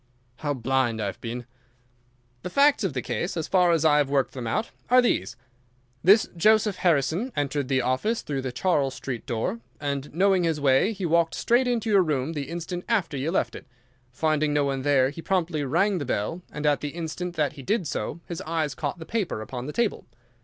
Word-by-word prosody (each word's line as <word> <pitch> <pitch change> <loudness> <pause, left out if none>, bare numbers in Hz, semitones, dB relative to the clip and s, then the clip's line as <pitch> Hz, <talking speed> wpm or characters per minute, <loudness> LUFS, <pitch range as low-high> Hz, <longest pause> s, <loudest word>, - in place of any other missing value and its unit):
"How 145 -1 -2
blind 130 -2 0
I 105 - -1
have 100 -2 -5
been!" 120 +1 -5 1.0
"The 180 - -5
facts 280 +2 +4
of 190 -7 -1
the 125 - -3
case, 170 +9 -3
as 160 - -2
far 180 -2 +4
as 165 -1 +2
I 150 -2 +5
have 145 -2 +2
worked 140 -2 +1
them 125 -3 -5
out, 220 - -1 0.2
are 250 +1 +7
these: 235 - +1 0.7
this 200 +5 +6
Joseph 215 +2 +3
Harrison 170 - +1
entered 145 -1 -1
the 130 -2 +1
office 130 - 0
through 140 -2 -3
the 130 -1 -4
Charles 140 -2 0
Street 125 -3 -6
door, 135 - -2 0.2
and 140 -1 -3
knowing 190 +2 +3
his 165 -3 0
way 140 +8 +3
he 200 -4 -4
walked 165 0 +2
straight 245 +2 +2
into 230 -3 0
your 200 -2 +6
room 150 -2 -1
the 140 -3 -4
instant 175 +1 -5
after 190 -10 +1
you 140 +4 -1
left 185 - 0
it. - - -10 0.4
Finding 155 +2 +1
no 145 - +3
one 135 -1 -1
there 135 -1 +3
he 165 - -8
promptly 170 -4 0
rang 180 +8 +1
the - - -2
bell, 130 - -2
and 150 0 -5
at 145 -1 +2
the 145 +1 -5
instant 175 +1 -4
that 150 -4 0
he 140 - -10
did 195 - 0
so 170 - -4
his 170 - -6
eyes 155 -3 -1
caught 155 - -3
the 160 - -9
paper 200 - -2
upon 125 +4 -6
the - - -3
table. 235 +4 -1
155 Hz, 210 wpm, -26 LUFS, 135-185 Hz, 1.0 s, are